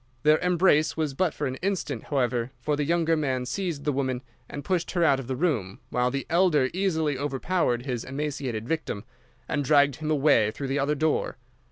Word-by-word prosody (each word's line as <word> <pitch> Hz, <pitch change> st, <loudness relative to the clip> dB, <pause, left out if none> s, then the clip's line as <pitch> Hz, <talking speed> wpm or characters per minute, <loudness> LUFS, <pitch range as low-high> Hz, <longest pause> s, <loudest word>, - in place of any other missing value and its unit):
Their 155 Hz, +1 st, +5 dB
embrace 175 Hz, -4 st, +3 dB
was 155 Hz, -3 st, -1 dB
but 175 Hz, +4 st, +1 dB
for 150 Hz, -, -4 dB
an 130 Hz, -1 st, -3 dB
instant, 180 Hz, -, -2 dB
however, 125 Hz, -4 st, 0 dB
for 150 Hz, +4 st, 0 dB
the 145 Hz, -, -1 dB
younger 165 Hz, +1 st, +2 dB
man 130 Hz, -5 st, -1 dB
seized 170 Hz, -1 st, -3 dB
the 150 Hz, -, +1 dB
woman 130 Hz, -2 st, -2 dB, 0.3 s
and 145 Hz, -, -7 dB
pushed 180 Hz, -3 st, 0 dB
her 175 Hz, -2 st, +2 dB
out 140 Hz, -4 st, +4 dB
of 130 Hz, -, -7 dB
the 130 Hz, -, -2 dB
room, 125 Hz, -, -1 dB
while 125 Hz, 0 st, +1 dB
the 135 Hz, +2 st, -3 dB
elder 165 Hz, -6 st, +3 dB
easily 160 Hz, -7 st, 0 dB
overpowered 140 Hz, -2 st, 0 dB
his 125 Hz, -4 st, -3 dB
emaciated 135 Hz, -5 st, -4 dB
victim, 155 Hz, -10 st, -3 dB, 0.4 s
and 145 Hz, -, -1 dB
dragged 140 Hz, -1 st, +4 dB
him 155 Hz, -1 st, -4 dB
away 140 Hz, -8 st, +4 dB
through 135 Hz, +5 st, -5 dB
the 140 Hz, +2 st, 0 dB
other 145 Hz, +2 st, +1 dB
door. 155 Hz, -3 st, 0 dB
145 Hz, 195 wpm, -26 LUFS, 130-160 Hz, 0.4 s, Their